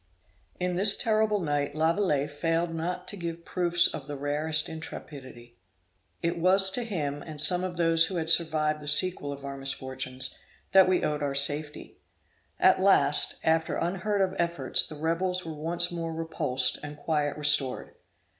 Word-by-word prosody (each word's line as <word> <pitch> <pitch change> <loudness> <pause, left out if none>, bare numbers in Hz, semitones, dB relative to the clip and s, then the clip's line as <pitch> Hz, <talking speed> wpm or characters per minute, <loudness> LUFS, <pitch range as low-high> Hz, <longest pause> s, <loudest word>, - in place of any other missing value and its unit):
In 180 -1 -2
this 200 +2 +6
terrible 215 -2 0
night 145 -3 -2
Lavilette 160 -3 0
failed 165 +3 -2
not 165 +2 -5
to - - -5
give 170 -2 -7
proofs 175 -1 +1
of 140 - -3
the 145 - -6
rarest 150 +2 -1
intrepidity. 130 - -11 0.6
It 170 0 -2
was 190 +2 +4
to 245 +5 -2
him 150 -10 -4
and 155 -2 -9
some 180 +4 +4
of 180 -2 -5
those 165 -1 +3
who 185 - -6
had 165 -2 -3
survived 155 -2 +2
the 150 - -11
sequel 150 -1 +2
of 140 0 -9
our 140 0 -7
misfortunes, 130 -1 -4 0.4
that 190 -1 +5
we 185 - +1
owed 150 -1 -2
our 140 -1 -3
safety. 145 +2 0 0.6
At - - +3
last, - - +3
after 160 0 0
unheard 195 +4 -2
of 190 -1 0
efforts, 170 -6 +2
the 155 - -8
rebels 170 +4 -2
were 160 - -6
once 170 +3 +1
more 165 -1 -5
repulsed, 160 -5 -1
and 150 0 -9
quiet 150 -1 -2
restored. 145 -3 +3
160 Hz, 165 wpm, -27 LUFS, 145-175 Hz, 0.6 s, this